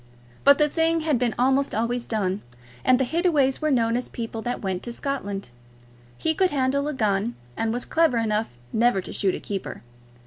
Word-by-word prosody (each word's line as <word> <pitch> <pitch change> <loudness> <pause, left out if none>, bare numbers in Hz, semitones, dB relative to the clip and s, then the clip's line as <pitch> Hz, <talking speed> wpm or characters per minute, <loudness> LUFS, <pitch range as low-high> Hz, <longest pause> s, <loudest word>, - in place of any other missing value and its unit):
But 280 0 +7
the 300 - +4
thing 325 +1 +1
had 305 -6 +1
been 240 -2 0
almost 270 +3 +2
always 235 +2 -1
done, 200 -3 -1 0.4
and 255 0 +4
the 265 - +2
Hittaways 305 -4 +2
were 310 - +1
known 230 -4 +2
as 250 - -2
people 225 -1 -5
that 245 +2 -3
went 190 -2 -2
to 240 - -5
Scotland. 205 - -4 0.7
He 320 - +1
could 370 +3 +2
handle 280 0 0
a 300 - -2
gun, 215 0 0 0.2
and 225 0 -1
was 245 +2 -1
clever 320 -7 +2
enough 215 - -1 0.2
never 235 -2 +3
to 185 - -6
shoot 195 -3 +1
a - - -5
keeper. 195 -2 -5
245 Hz, 195 wpm, -24 LUFS, 220-280 Hz, 0.7 s, But